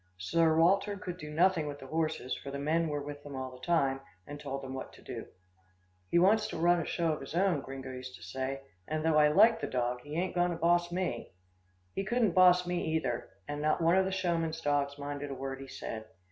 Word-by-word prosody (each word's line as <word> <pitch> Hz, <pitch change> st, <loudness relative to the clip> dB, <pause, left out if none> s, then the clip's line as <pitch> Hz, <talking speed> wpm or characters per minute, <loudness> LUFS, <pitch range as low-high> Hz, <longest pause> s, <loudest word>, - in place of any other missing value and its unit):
Sir 160 Hz, -, +2 dB
Walter 195 Hz, +5 st, +3 dB
could 180 Hz, -2 st, -6 dB
do 150 Hz, -, -7 dB
nothing 160 Hz, 0 st, +2 dB
with 145 Hz, -1 st, -5 dB
the 135 Hz, -, -11 dB
horses, 155 Hz, -3 st, -1 dB
for 140 Hz, -, -8 dB
the 140 Hz, -, -4 dB
men 160 Hz, +4 st, +1 dB
were 145 Hz, -1 st, -2 dB
with 145 Hz, 0 st, -7 dB
them 145 Hz, -1 st, -8 dB
all 130 Hz, -1 st, -4 dB
the 125 Hz, 0 st, -14 dB
time, 135 Hz, -6 st, +2 dB, 0.2 s
and 145 Hz, 0 st, -8 dB
told 135 Hz, -2 st, -5 dB
them 130 Hz, 0 st, -6 dB
what 130 Hz, -, -6 dB
to -, -, -15 dB
do. -, -, -7 dB, 0.8 s
"He -, -, +3 dB
wants 205 Hz, +5 st, +4 dB
to -, -, -5 dB
run 175 Hz, +2 st, +4 dB
a -, -, -4 dB
show 165 Hz, -2 st, 0 dB
of 150 Hz, -, -5 dB
his 135 Hz, +4 st, -7 dB
own," 180 Hz, -5 st, +2 dB
Gringo 135 Hz, -1 st, -7 dB
used 130 Hz, 0 st, -7 dB
to -, -, -14 dB
say, 135 Hz, +1 st, -4 dB, 0.3 s
"and 155 Hz, 0 st, -2 dB
though 160 Hz, -1 st, +4 dB
I 150 Hz, -, +7 dB
like 210 Hz, +9 st, +5 dB
the -, -, -1 dB
dog, 125 Hz, -1 st, -1 dB
he 145 Hz, +3 st, -8 dB
ain't 185 Hz, +1 st, -1 dB
going 175 Hz, 0 st, +2 dB
to 170 Hz, -, -3 dB
boss 175 Hz, +1 st, +2 dB
me!" 180 Hz, -, -3 dB, 0.6 s
He 195 Hz, -, -2 dB
couldn't 225 Hz, 0 st, +2 dB
boss 180 Hz, 0 st, +6 dB
me, 175 Hz, 0 st, -1 dB
either, 125 Hz, -7 st, -2 dB, 0.2 s
and 145 Hz, 0 st, -4 dB
not 155 Hz, 0 st, +2 dB
one 165 Hz, +1 st, +4 dB
of 190 Hz, 0 st, +4 dB
the 190 Hz, -, -1 dB
showman's 170 Hz, -4 st, -1 dB
dogs 145 Hz, -2 st, 0 dB
minded 145 Hz, 0 st, -5 dB
a 135 Hz, -, -4 dB
word 135 Hz, 0 st, -5 dB
he 135 Hz, -, -8 dB
said. 110 Hz, -3 st, -6 dB
155 Hz, 240 wpm, -31 LUFS, 135-175 Hz, 0.8 s, I